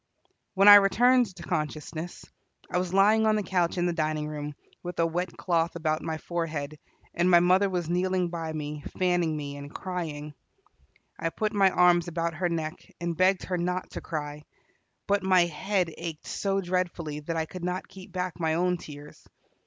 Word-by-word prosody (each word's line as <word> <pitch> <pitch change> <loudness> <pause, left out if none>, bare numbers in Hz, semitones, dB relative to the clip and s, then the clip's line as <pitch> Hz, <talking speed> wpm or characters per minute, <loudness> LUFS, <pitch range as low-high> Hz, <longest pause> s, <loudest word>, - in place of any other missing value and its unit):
When 195 +1 +5
I 205 0 +13
returned 245 +5 +4
to 175 - -10
consciousness, 155 +1 -4 0.5
I 180 - +1
was 180 -1 -2
lying 210 +3 +4
on 215 - +4
the 210 - 0
couch 180 -1 0
in 175 - +1
the 175 - +1
dining 155 -1 -1
room, 150 -1 -5 0.3
with 175 0 -6
a 165 - +4
wet 175 +1 -3
cloth 170 -2 0
about 155 -1 -1
my 160 -1 -3
forehead, 155 -3 -4 0.3
and 175 +1 +2
mother 180 +3 +5
was 175 -3 -2
kneeling 180 +1 0
by 165 -2 -4
me, 150 -1 -5
fanning 175 -4 +1
me 145 -1 -5
and 145 0 -9
crying. 155 -6 -5 0.9
I 165 - 0
put 215 +5 -2
my 195 -2 +5
arms 175 -1 +4
about 170 0 -2
her 175 +2 -1
neck, 160 -1 -3 0.2
and 170 -1 -2
begged 185 +2 +3
her 180 -1 -2
not 180 +1 -2
to - - -6
cry, 150 -2 -5 0.6
but 200 0 +2
my 185 -1 +4
head 180 +1 -1
ached 165 -2 -7
so 195 -1 -1
dreadfully 175 -4 -2
that 165 +2 -4
I 160 - 0
could 180 +2 -9
not 180 +1 -3
keep 185 -1 -13
back 180 -1 -3
my 160 -1 +1
own 180 +1 +1
tears. 150 -2 -12
175 Hz, 185 wpm, -27 LUFS, 155-185 Hz, 0.9 s, I